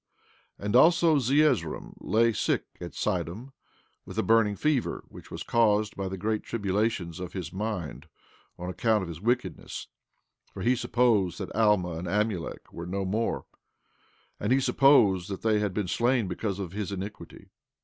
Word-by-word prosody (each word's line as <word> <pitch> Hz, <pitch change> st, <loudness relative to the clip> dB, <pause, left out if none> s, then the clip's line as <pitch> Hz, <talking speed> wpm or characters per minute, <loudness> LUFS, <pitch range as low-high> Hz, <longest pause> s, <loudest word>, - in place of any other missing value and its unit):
15:3 -, -, -8 dB
And 105 Hz, +3 st, 0 dB
also 165 Hz, +3 st, +6 dB
Zeezrom 135 Hz, -, +1 dB
lay 115 Hz, +1 st, +2 dB
sick -, -, 0 dB, 0.2 s
at 85 Hz, -, -7 dB
Sidom, 100 Hz, -, -2 dB, 0.5 s
with -, -, -10 dB
a 110 Hz, -, +2 dB
burning 110 Hz, 0 st, +3 dB
fever, 150 Hz, +1 st, 0 dB
which -, -, -13 dB
was -, -, -6 dB
caused 110 Hz, -2 st, +2 dB
by 95 Hz, -1 st, -3 dB
the 95 Hz, -, -5 dB
great 110 Hz, +3 st, -1 dB
tribulations 100 Hz, -4 st, -1 dB
of 90 Hz, -1 st, -6 dB
his 90 Hz, -5 st, -5 dB
mind 90 Hz, -, -4 dB, 0.5 s
on 90 Hz, -, -6 dB
account 105 Hz, +2 st, +1 dB
of -, -, -5 dB
his 85 Hz, 0 st, -8 dB
wickedness, 120 Hz, +3 st, -2 dB, 0.6 s
for -, -, -7 dB
he 125 Hz, +2 st, +3 dB
supposed 110 Hz, -8 st, +2 dB
that -, -, -6 dB
Alma 100 Hz, -7 st, +2 dB
and 90 Hz, -, -5 dB
Amulek 105 Hz, -2 st, -2 dB
were 85 Hz, +1 st, -6 dB
no 95 Hz, +2 st, -2 dB
more; 110 Hz, +5 st, -1 dB, 0.9 s
and 105 Hz, -, -1 dB
he 130 Hz, -, +5 dB
supposed 125 Hz, -10 st, +4 dB
that 95 Hz, -, -5 dB
they 110 Hz, -1 st, +3 dB
had 105 Hz, -2 st, 0 dB
been 100 Hz, 0 st, -2 dB
slain 120 Hz, +2 st, +1 dB
because 95 Hz, +2 st, -3 dB
of 95 Hz, -4 st, -5 dB
his 105 Hz, 0 st, -4 dB
iniquity. 100 Hz, +2 st, -7 dB
105 Hz, 165 wpm, -28 LUFS, 95-115 Hz, 0.9 s, also